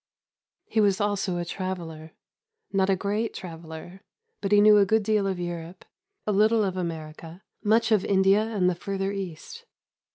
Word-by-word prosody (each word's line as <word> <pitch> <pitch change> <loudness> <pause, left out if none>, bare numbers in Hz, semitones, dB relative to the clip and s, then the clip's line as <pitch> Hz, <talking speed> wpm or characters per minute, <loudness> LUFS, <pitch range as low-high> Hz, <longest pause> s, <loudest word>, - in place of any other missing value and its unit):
He 220 - +1
was 200 -2 +3
also 200 -3 0
a 175 - -3
traveller 165 -4 -6 0.6
not 195 0 +2
a 195 - +4
great 205 +4 -2
traveller, 165 +1 -9 0.4
but 195 - -2
he 205 - +6
knew 210 0 +7
a - - +6
good 220 +2 +2
deal 210 -1 +1
of 190 -2 -2
Europe, 175 0 -6 0.4
a 215 - 0
little 215 +2 +3
of 190 -2 -1
America, 165 0 -6 0.2
much 225 +2 +3
of 210 -3 +4
India 195 +1 +4
and 210 -5 0
the 180 - +3
further 195 +2 -3
East. 195 - -7
195 Hz, 165 wpm, -26 LUFS, 175-210 Hz, 0.6 s, knew